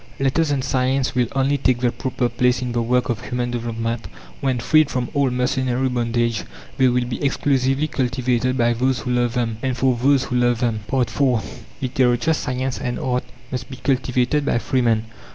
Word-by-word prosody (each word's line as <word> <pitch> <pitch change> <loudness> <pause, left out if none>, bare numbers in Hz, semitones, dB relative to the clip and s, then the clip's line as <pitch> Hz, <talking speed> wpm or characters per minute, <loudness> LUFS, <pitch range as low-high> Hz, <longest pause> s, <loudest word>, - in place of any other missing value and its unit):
Letters 135 +4 +1
and 140 -2 0
science 130 0 0
will 125 -1 +2
only 135 +1 +2
take 130 -2 +2
their 120 -1 +2
proper 125 0 -1
place 125 +1 +1
in 125 - -3
the 120 0 0
work 125 +2 +1
of 120 0 -2
human 125 0 -2
development 115 -1 -3 0.3
when, 130 -2 0
freed 155 +5 +3
from 125 -2 -2
all 140 -2 +2
mercenary 125 0 0
bondage, 115 -2 0 0.3
they 130 - +4
will 125 0 +2
be 120 +3 -5
exclusively 135 +1 +1
cultivated 130 -1 0
by 120 -1 +3
those 130 +2 0
who 125 - -3
love 120 0 +1
them, 115 -3 -1
and 130 -2 -1
for 130 0 +2
those 135 +2 +3
who 125 - -2
love 120 -1 +3
them. 115 -3 0
IV 130 -2 +2 0.8
Literature, 125 +3 +2
science, 130 -3 -2
and 120 0 -3
art 125 -1 -1 0.3
must 130 +1 -4
be 130 - -8
cultivated 130 +1 +1
by 140 - +1
free 120 +3 0
men. 115 -2 +2
125 Hz, 190 wpm, -21 LUFS, 120-130 Hz, 0.8 s, they